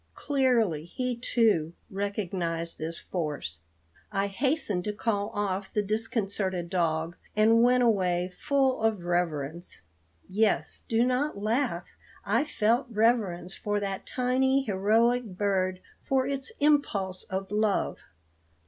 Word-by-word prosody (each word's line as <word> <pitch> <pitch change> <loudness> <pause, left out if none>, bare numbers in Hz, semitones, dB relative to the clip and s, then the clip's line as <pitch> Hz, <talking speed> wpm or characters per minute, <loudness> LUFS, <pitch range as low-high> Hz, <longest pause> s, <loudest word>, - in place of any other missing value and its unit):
Clearly 240 - +1
he, 250 +8 -3
too, 220 -9 +2 0.2
recognized 185 -4 -2
this 165 +2 -4
force. 145 - -4 0.5
I 195 -1 +1
hastened 210 - 0
to 210 - -1
call 205 -1 -1
off 195 -1 -2
the 210 - 0
disconcerted 200 -4 -1
dog, 165 -2 0 0.2
and 225 +2 +5
went 250 +1 +4
away 185 -5 +1
full 270 -2 +1
of 220 -5 +1
reverence. 170 - -2 0.4
Yes; 210 +2 +1
do 230 +1 +3
not 255 +1 0
laugh. 215 -3 0 0.4
I - - +2
felt 235 -2 +1
reverence 210 -6 +1
for 205 0 -1
that 195 -1 -4
tiny 265 +2 +2
heroic 225 +4 +2
bird 185 -2 0 0.2
for 265 -1 +1
its 275 -1 -3
impulse 215 -11 +1
of 190 +1 -4
love. 210 -1 +1
205 Hz, 120 wpm, -28 LUFS, 180-240 Hz, 0.5 s, and